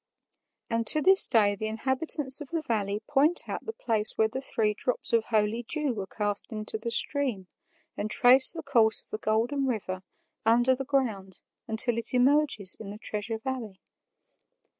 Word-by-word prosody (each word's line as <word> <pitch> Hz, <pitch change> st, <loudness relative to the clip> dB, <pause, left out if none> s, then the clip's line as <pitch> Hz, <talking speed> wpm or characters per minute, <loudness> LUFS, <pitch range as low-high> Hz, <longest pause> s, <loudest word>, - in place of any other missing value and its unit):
And 230 Hz, 0 st, -3 dB
to 305 Hz, -, +7 dB
this 380 Hz, +5 st, +3 dB
day 210 Hz, -4 st, +2 dB
the 215 Hz, +2 st, -6 dB
inhabitants 265 Hz, +5 st, +1 dB
of 290 Hz, -, -9 dB
the 330 Hz, -2 st, -4 dB
valley 210 Hz, -4 st, -3 dB
point 290 Hz, +4 st, +1 dB
out -, -, -7 dB
the -, -, -3 dB
place 225 Hz, -, +2 dB
where 220 Hz, -, +2 dB
the 260 Hz, +4 st, -7 dB
three 215 Hz, -5 st, -1 dB
drops 245 Hz, +2 st, -4 dB
of 230 Hz, -1 st, +1 dB
holy 215 Hz, +1 st, -1 dB
dew 290 Hz, +2 st, -3 dB
were 200 Hz, -4 st, -7 dB
cast 205 Hz, +3 st, -4 dB
into 215 Hz, 0 st, -5 dB
the 235 Hz, -, -5 dB
stream, 240 Hz, -5 st, +2 dB, 0.5 s
and 215 Hz, -, -5 dB
trace 260 Hz, +3 st, +5 dB
the 325 Hz, -1 st, -8 dB
course 230 Hz, -6 st, +3 dB
of -, -, -25 dB
the 215 Hz, -, -6 dB
Golden 235 Hz, +6 st, -2 dB
River 190 Hz, -6 st, -5 dB, 0.4 s
under 240 Hz, +3 st, +2 dB
the 270 Hz, +1 st, -7 dB
ground 220 Hz, -9 st, -3 dB, 0.3 s
until 230 Hz, +1 st, +5 dB
it 230 Hz, -, -3 dB
emerges 255 Hz, -6 st, +2 dB
in 210 Hz, -, -10 dB
the 205 Hz, -, -9 dB
Treasure 215 Hz, +1 st, -4 dB
Valley. 225 Hz, -5 st, -7 dB
230 Hz, 175 wpm, -26 LUFS, 215-270 Hz, 0.5 s, to